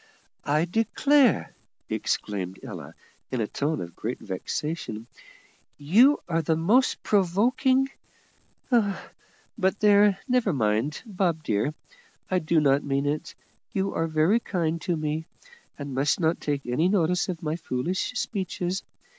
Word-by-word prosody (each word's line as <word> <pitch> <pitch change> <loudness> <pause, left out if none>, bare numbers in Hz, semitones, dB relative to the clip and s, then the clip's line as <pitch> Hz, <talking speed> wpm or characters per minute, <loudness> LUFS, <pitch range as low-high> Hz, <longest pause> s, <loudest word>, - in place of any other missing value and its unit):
"I 150 +3 +2
declare," 240 - +2 0.3
exclaimed 95 -2 -2
Ella, - - -8 0.3
in 130 - -2
a 110 - +1
tone 145 +7 -2
of 85 -1 -8
great 115 +4 -4
vexation, 110 - -4 0.7
"you 225 - +5
are 165 -2 +1
the 160 +1 +1
most 210 +11 +2
provoking 235 +8 +2 0.8
But 205 -2 -2
there, 205 -1 +5
never 250 -7 +2
mind, 115 +3 0
Bob 180 -7 -1
dear, 115 +6 0 0.6
I 185 - +3
do 160 0 +2
not 140 -1 +3
mean 140 0 0
it; 150 +1 -2 0.4
you 195 0 -1
are 165 - 0
very 160 +8 +3
kind 170 -6 -2
to 175 -3 -1
me, 155 +1 -3 0.5
and 140 -2 -6
must 135 +3 +1
not 165 -1 +1
take 145 -2 -2
any 140 +9 +1
notice 180 -2 +1
of 170 -3 -4
my 155 0 -1
foolish 170 - -2
speeches. 190 -6 -2
165 Hz, 130 wpm, -26 LUFS, 145-200 Hz, 0.8 s, you